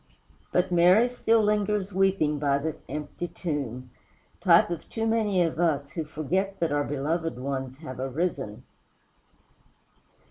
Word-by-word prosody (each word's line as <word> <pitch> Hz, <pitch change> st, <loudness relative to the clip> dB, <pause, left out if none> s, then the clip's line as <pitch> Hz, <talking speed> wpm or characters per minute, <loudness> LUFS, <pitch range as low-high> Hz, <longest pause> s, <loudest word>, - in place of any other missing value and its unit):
But 180 Hz, +1 st, +1 dB
Mary 180 Hz, +7 st, +5 dB
still 230 Hz, -2 st, +2 dB
lingers 210 Hz, -1 st, 0 dB
weeping 185 Hz, -6 st, +2 dB
by 140 Hz, -1 st, +2 dB
the 155 Hz, +2 st, -2 dB, 0.2 s
empty 150 Hz, +3 st, -5 dB
tomb 130 Hz, -8 st, -4 dB, 0.5 s
type -, -, +5 dB
of 170 Hz, -, -5 dB
too 225 Hz, -1 st, -2 dB
many 215 Hz, -5 st, +2 dB
of 165 Hz, -1 st, -2 dB
us, 145 Hz, -5 st, +1 dB
who 160 Hz, -3 st, -4 dB
forget 185 Hz, +6 st, -2 dB
that 165 Hz, -3 st, 0 dB
our 145 Hz, 0 st, +1 dB
beloved 150 Hz, +1 st, -2 dB
ones 130 Hz, 0 st, -4 dB
have 135 Hz, -5 st, -8 dB
arisen. 135 Hz, -5 st, -3 dB
165 Hz, 135 wpm, -27 LUFS, 140-190 Hz, 0.5 s, Mary